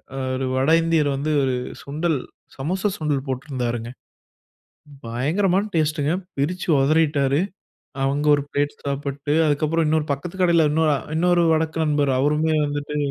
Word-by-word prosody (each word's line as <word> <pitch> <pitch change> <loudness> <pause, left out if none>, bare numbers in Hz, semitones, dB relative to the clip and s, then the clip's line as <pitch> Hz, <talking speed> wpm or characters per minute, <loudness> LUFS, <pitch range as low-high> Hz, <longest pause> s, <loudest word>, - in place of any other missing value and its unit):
அ - - -5 0.2
ஒரு 130 0 -2
வடஇந்தியர் 160 +2 +3
வந்து, 145 +3 -2
ஒரு 130 - +1 0.3
சுண்டல் 155 +2 -1 0.4
சமோசா 185 +9 -1
சுண்டல் 145 -3 -1
போட்ருந்தாருங்க. 125 -3 -3 1.2
பயங்கரமான 175 - +1
டேஸ்டுங்க. 155 -1 +1 0.3
பிரிச்சு 175 +7 -2
ஒதறிட்டாரு. 145 -1 +2 0.6
அவுங்க 140 +2 0
ஒரு 145 - -3
பிளேட் 145 0 -1
சாப்புட்டு, 140 +1 -2
அதுக்கப்புறம் 155 +2 +1
இன்னொரு 155 -1 +1
பக்கத்து 165 +7 -7
கடையில 170 -3 +4
இன்னொ 160 +1 +2 0.3
இன்னொரு 175 +1 +3
வடக்க 160 0 -1
நண்பர். 145 -2 +1
அவருமே 150 +3 +2
வந்துட்டு 145 0 -4
150 Hz, 125 wpm, -22 LUFS, 140-160 Hz, 1.2 s, கடையில